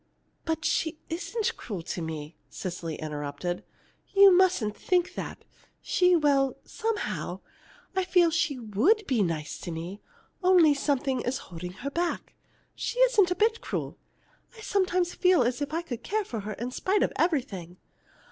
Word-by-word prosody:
"But 320 -1 -2
she 320 -1 0
isn't 405 +6 -2
cruel 195 -7 -6
to 175 - -4
me," 160 -1 -5
Cecily 170 -3 -5
interrupted. 150 +3 -4 0.5
"You 395 -2 +9
mustn't 355 - +3
think 360 -2 +1
that. - - -6 0.3
She 360 -1 +3
well, 280 -4 +2
somehow, 445 -2 -3 0.5
I 380 - +2
feel 355 -2 +4
she 335 -4 0
would 250 - +2
be 255 - +1
nice 165 -5 -2
to - - -6
me, 170 +5 -6 0.4
only 360 -5 +6
something 275 -2 0
is 255 +2 -1
holding 180 +1 -8
her 280 - -1
back. 345 +3 -2 0.4
She - - -4
isn't - - +5
a 360 - 0
bit 445 +3 +2
cruel. - - -4 0.6
I - - -10
sometimes 370 -4 +1
feel 365 -6 +4
as 245 +4 -1
if 285 0 -2
I 330 +2 -1
could 245 -9 -6
care 425 0 -1
for 230 - -4
her 210 +1 -5
in 240 +5 -5
spite 390 +9 +1
of - - 0
everything. 195 - -1
295 Hz, 155 wpm, -28 LUFS, -, 0.6 s, You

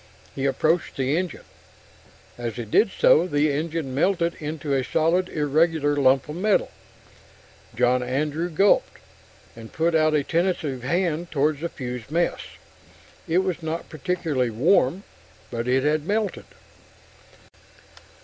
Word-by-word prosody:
He 135 0 -1
approached 155 +6 0
the 135 +2 0
engine. 180 -1 -3 0.9
As 120 -2 -5
he 120 - -5
did 200 - +3
so, 175 -2 +4
the 145 -2 +1
engine 155 -1 -3
melted 170 +3 +1
into 150 -1 -4
a 135 -1 +1
solid, 170 +7 +1
irregular 150 0 +1
lump 135 -1 +3
of 150 +2 -6
metal. 205 +2 +1 1.0
John 125 +2 +2
Andrew 150 +7 -2
gulped, 195 +5 +2 0.6
and 115 -1 -11
put 165 +1 0
out 155 -1 +3
a 145 - +2
tentative 165 -5 -1
hand 170 +4 -1
toward 150 0 0
the 170 +2 -3
fused 125 -4 -7
mess. 170 +3 0 0.9
It 175 +3 +2
was 180 -3 -3
not 160 +1 -4
particularly 155 -5 -1
warm 140 - +2 0.5
but 120 0 -3
it 130 +1 +2
had 150 +1 0
melted. 210 -1 -1
155 Hz, 130 wpm, -24 LUFS, 135-170 Hz, 1.0 s, so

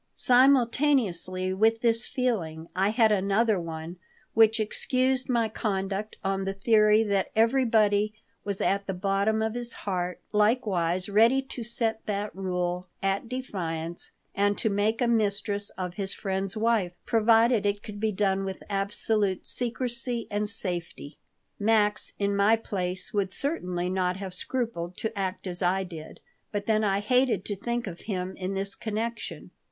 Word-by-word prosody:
Simultaneously 245 - +3
with 225 +3 +2
this 230 -1 +1
feeling 180 - -2
I 190 +2 +2
had 220 0 +3
another 200 +1 +2
one 165 +1 -6 0.4
which 225 0 +5
excused 255 +4 0
my 235 -3 +2
conduct 200 -1 -3
on 195 0 -1
the 195 0 -3
theory 215 +1 +4
that 200 -3 0
everybody 220 -3 +3 0.3
was 200 -1 -3
at 200 0 0
the 195 - -2
bottom 200 +3 +1
of 220 0 -1
his 240 0 -4
heart 180 -2 -2
likewise 200 -5 +1
ready 225 +6 +4
to 255 -2 -7
set 225 -1 -1
that 205 0 -3
rule 180 -1 -2 0.2
at 195 +3 0
defiance 175 -10 -5 0.2
and 205 +1 +1
to 220 - 0
make 210 +3 0
a - - +2
mistress 205 -2 0
of 180 -2 -4
his 195 +1 -2
friend's 195 +1 -2
wife, 215 -5 +1
provided 225 0 +4
it 205 0 -1
could 210 -2 -8
be 220 0 +1
done 195 -1 0
with 190 -1 -5
absolute 200 0 0
secrecy 240 -1 0
and 205 0 0
safety. 175 -8 -3 0.4
Max 210 0 +2
in 200 0 0
my 200 +3 +5
place 185 -5 -4
would 200 -2 0
certainly 180 - -2
not 185 0 0
have 195 -2 -5
scrupled 180 -4 -2
to 225 0 -3
act 195 0 -3
as 180 -1 -2
I 190 +2 +2
did. 165 -4 -10 0.3
But 205 -1 -3
then 215 0 +2
I 200 -1 +1
hated 250 -3 +2
to 205 - -2
think 235 +4 -3
of 175 -4 -7
him 185 -1 -3
in 190 +1 -3
this 195 +1 -2
connection. 230 +1 -4
205 Hz, 155 wpm, -27 LUFS, 190-225 Hz, 0.4 s, which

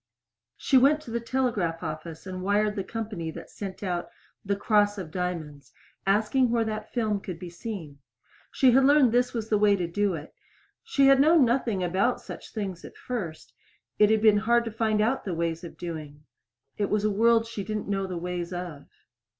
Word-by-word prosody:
She 265 - +4
went 285 +4 +4
to 240 - -10
the 235 - -1
telegraph 225 -9 -1
office 160 +1 -6
and 185 -1 -6
wired 205 +2 +1
the 195 - -2
company 210 -6 -5
that - - -9
sent 195 0 -7
out 175 -3 -2 0.3
"The 200 0 0
Cross 205 0 +2
of 175 -5 -6
Diamonds," 155 -8 -4 0.4
asking 220 +6 +3
where 230 -1 +2
that 215 0 -5
film 215 -4 0
could 185 -3 -7
be 175 0 -8
seen. 170 -8 -7 0.5
She 260 -3 +4
had 265 +3 +5
learned 280 -2 +6
that - - -4
this 245 +1 +1
was 225 -1 -3
the 210 - +2
way 205 -1 +5
to 180 -3 -2
do 195 +2 0
it. 150 -1 -9 0.5
She 370 -12 +2
had 270 0 +6
known 310 -1 +6
nothing 235 -5 0
about 190 +8 +1
such - - -10
things 195 -5 -5
at - - -11
first; 190 -11 -6 0.5
it 210 - +6
had 220 0 +2
been 215 -2 +6
hard 235 +3 +2
to 225 - -4
find 220 -1 +1
out 235 +5 +1
the 185 -4 -3
ways 165 +1 -2
of 170 - -9
doing. 155 -4 -7 0.6
It 205 - 0
was 210 -1 +1
a 215 - +2
world 225 +2 +4
she 225 -3 -5
didn't 210 +2 -4
know 195 -1 -1
the 180 -2 -4
ways 175 0 -4
of. 175 -5 -6
205 Hz, 200 wpm, -27 LUFS, 175-230 Hz, 0.6 s, learned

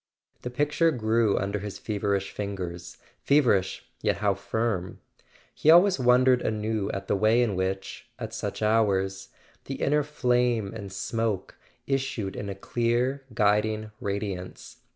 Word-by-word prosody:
The 125 - -4
picture 150 +6 +2
grew 115 -5 +1
under 100 +2 -1
his 105 0 -6
feverish 100 -2 -2
fingers—feverish, 95 +4 -1 0.2
yet - - +1
how 100 0 +2
firm! 100 -2 -2 0.5
He 155 - +1
always 175 +1 +7
wondered 125 0 +4
anew 110 -1 -1
at 95 0 -4
the - - +1
way 110 +4 +4
in 110 -4 0
which, 95 +1 -3
at - - -6
such - - -4
hours, 95 -3 +1 0.4
the 135 - -4
inner 150 +2 +2
flame 125 -7 0
and 100 -3 -7
smoke 110 0 -2 0.3
issued 135 -7 -2
in 100 - -5
a 100 - -4
clear 120 +5 -1
guiding 110 0 +1
radiance. 100 -4 -5
110 Hz, 130 wpm, -27 LUFS, 100-125 Hz, 0.5 s, always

